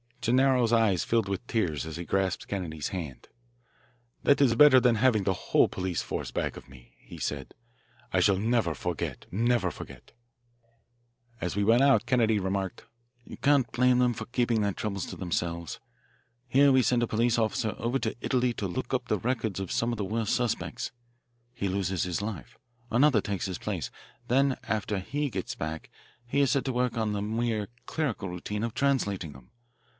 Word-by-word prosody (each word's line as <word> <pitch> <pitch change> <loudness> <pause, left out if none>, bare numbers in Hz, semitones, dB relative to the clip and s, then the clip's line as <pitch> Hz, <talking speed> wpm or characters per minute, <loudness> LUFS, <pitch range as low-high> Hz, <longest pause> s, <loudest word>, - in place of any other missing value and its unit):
Gennaro's 125 -1 +3
eyes 110 -6 +3
filled 115 -3 +1
with 100 +4 -3
tears 85 -11 -1
as 80 0 -6
he 85 - -5
grasped 95 0 -1
Kennedy's 80 -6 -3
hand. 80 -9 -6 1.0
"That 140 - +4
is 125 -5 +4
better 135 0 +8
than 125 -1 +3
having 110 -3 +3
the 95 - +1
whole - - +2
police 90 -2 -3
force - - -4
back - - -3
of - - -12
me," 65 -3 -16
he - - -12
said. 70 -3 -4 0.6
"I - - +4
shall 100 - +4
never 110 -4 +1
forget, 85 +4 -4
never 115 -1 +1
forget." - - -11 1.3
As 90 - -3
we 100 - +1
went 115 +5 +5
out 140 0 +4
Kennedy 110 -4 +3
remarked: 95 +1 -3 0.4
"You - - -10
can't 140 -5 +3
blame 125 0 +3
them 125 -1 +3
for 110 - -6
keeping 120 -3 +1
their 100 -1 0
troubles 100 -1 -3
to - - -7
themselves. 85 -2 -3 0.7
Here 140 +3 +5
we 130 -1 +5
send 120 +2 +2
a 120 - +1
police 115 +2 +1
officer 110 -1 0
over 120 +3 0
to 110 - -2
Italy 125 -2 +1
to 100 - -3
look 90 - -4
up - - 0
the - - 0
records 115 -5 -1
of 95 -2 -4
some 115 +1 0
of 120 - -3
the 100 - -2
worst 110 +2 0
suspects. 120 -2 -2 0.6
He 100 -5 -2
loses 95 -1 -1
his 90 +1 -2
life. 100 - -6 0.3
Another 125 -2 +4
takes 100 -2 -3
his 95 -3 -4
place. - - -3 0.4
Then 135 +2 +3
after 105 -1 -1
he 145 +9 -2
gets - - -4
back 80 +1 -5 0.4
he 140 +4 +1
is 135 -4 +3
set 140 - +1
to 130 - -1
work 125 -1 0
on 110 -2 0
the 100 - -2
mere 110 -1 -1 0.2
clerical 130 - -2
routine 105 +4 -4
of 115 -1 -2
translating 100 - 0
them. 65 -2 -16
110 Hz, 185 wpm, -28 LUFS, 95-125 Hz, 1.3 s, better